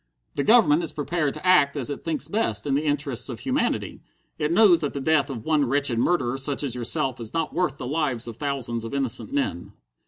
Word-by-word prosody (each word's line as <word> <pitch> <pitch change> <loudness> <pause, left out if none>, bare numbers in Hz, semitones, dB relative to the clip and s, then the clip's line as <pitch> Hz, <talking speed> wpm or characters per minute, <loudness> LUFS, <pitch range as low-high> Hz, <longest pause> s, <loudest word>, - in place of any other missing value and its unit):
"The 140 - -1
Government 190 - +5
is 165 - -3
prepared 150 -1 -2
to - - -9
act 150 -6 +4
as 140 0 -1
it 145 - -6
thinks 160 -2 -2
best 110 - 0
in 140 - 0
the 145 +3 0
interests 145 -4 -1
of 115 -5 -7
humanity. - - -2 0.4
It 150 +1 0
knows 180 -2 +6
that 145 - -3
the 140 - -4
death 145 0 +2
of 120 -5 -6
one 155 -2 +2
wretched 140 -4 +1
murderer 135 -3 +1
such 140 +1 0
as 135 -5 -1
yourself 125 +2 0
is 115 +3 -7
not 165 -2 -1
worth 165 -4 -1
the - - -6
lives 135 -4 -1
of 115 -2 -7
thousands 130 -5 -3
of 115 +4 -5
innocent 135 - -1
men!" 285 0 -3
145 Hz, 220 wpm, -24 LUFS, 130-160 Hz, 0.4 s, knows